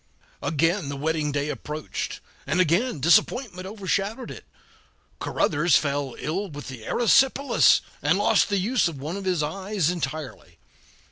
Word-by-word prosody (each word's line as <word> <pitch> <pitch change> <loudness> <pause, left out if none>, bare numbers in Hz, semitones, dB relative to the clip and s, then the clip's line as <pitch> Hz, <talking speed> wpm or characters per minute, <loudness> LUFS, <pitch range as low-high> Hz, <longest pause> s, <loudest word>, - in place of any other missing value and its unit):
Again 165 +1 0
the 140 - -4
wedding 150 +1 -1
day 145 +1 -1
approached, 150 +1 -5 0.3
and 155 +6 0
again 180 - +2
disappointment 185 - +2
overshadowed 200 +3 -2
it; - - -10 0.7
Caruthers 160 +1 +2
fell 140 -3 -2
ill 190 +6 -3
with 145 -2 -8
the 125 -4 -9
erysipelas, 270 +3 +4 0.2
and - - +2
lost - - +3
the 200 - +1
use 215 +3 +2
of 165 -4 -5
one 150 +6 -5
of 200 -1 -6
his 180 -5 +1
eyes 185 +1 -1
entirely. 135 - -6
165 Hz, 140 wpm, -25 LUFS, 145-195 Hz, 0.7 s, erysipelas